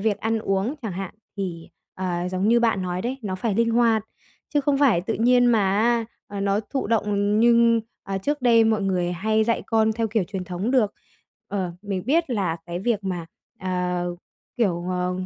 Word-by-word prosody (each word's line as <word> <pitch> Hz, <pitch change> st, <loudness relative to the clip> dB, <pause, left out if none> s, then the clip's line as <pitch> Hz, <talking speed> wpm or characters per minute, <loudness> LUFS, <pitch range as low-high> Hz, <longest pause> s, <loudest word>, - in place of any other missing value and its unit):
việc 210 Hz, 0 st, 0 dB
ăn 225 Hz, 0 st, 0 dB
uống 195 Hz, +5 st, -1 dB
chẳng 220 Hz, -5 st, -3 dB
hạn, 190 Hz, 0 st, -5 dB, 0.2 s
thì, 175 Hz, -4 st, -5 dB, 0.3 s
ờ, 180 Hz, -1 st, -2 dB
giống 185 Hz, +3 st, 0 dB
như 235 Hz, +1 st, +5 dB
bạn 225 Hz, -5 st, +2 dB
nói 180 Hz, 0 st, -3 dB
đấy, 255 Hz, +3 st, -3 dB
nó 195 Hz, -3 st, -3 dB
phải 205 Hz, +2 st, -1 dB
linh 230 Hz, +2 st, +2 dB
hoạt 230 Hz, -2 st, +3 dB, 0.5 s
chứ 290 Hz, -, +4 dB
không 280 Hz, 0 st, +1 dB
phải 255 Hz, -12 st, +4 dB
tự 220 Hz, +5 st, -3 dB
nhiên 245 Hz, +2 st, +4 dB
mà 235 Hz, -2 st, +4 dB, 0.2 s
á, 235 Hz, +1 st, +2 dB, 0.2 s
à, 200 Hz, -1 st, -5 dB
nó 200 Hz, +1 st, +1 dB
thụ 245 Hz, +4 st, -3 dB
động 210 Hz, -1 st, +1 dB
nhưng 235 Hz, -1 st, +5 dB, 0.2 s
à, 195 Hz, 0 st, -3 dB
trước 290 Hz, +6 st, -2 dB
đây 230 Hz, -2 st, +5 dB
mọi 220 Hz, -2 st, +2 dB
người 180 Hz, -2 st, 0 dB
hay 215 Hz, +4 st, +1 dB
dạy 230 Hz, +1 st, 0 dB
con 220 Hz, -1 st, +2 dB
theo 225 Hz, 0 st, -1 dB
kiểu 210 Hz, -3 st, 0 dB
truyền 190 Hz, -1 st, -5 dB
thống 180 Hz, +5 st, -3 dB
được. 235 Hz, -6 st, +3 dB, 0.6 s
Ờ, 190 Hz, -3 st, -2 dB
mình 195 Hz, -3 st, -3 dB
biết 325 Hz, 0 st, +2 dB
là 190 Hz, -7 st, 0 dB
cái 170 Hz, 0 st, -4 dB
việc 210 Hz, +1 st, -1 dB
mà, 180 Hz, -3 st, -3 dB, 0.3 s
à, 180 Hz, -1 st, -1 dB, 0.5 s
kiểu, 180 Hz, -7 st, 0 dB
ờ, 180 Hz, 0 st, -1 dB
210 Hz, 200 wpm, -24 LUFS, 185-230 Hz, 0.6 s, như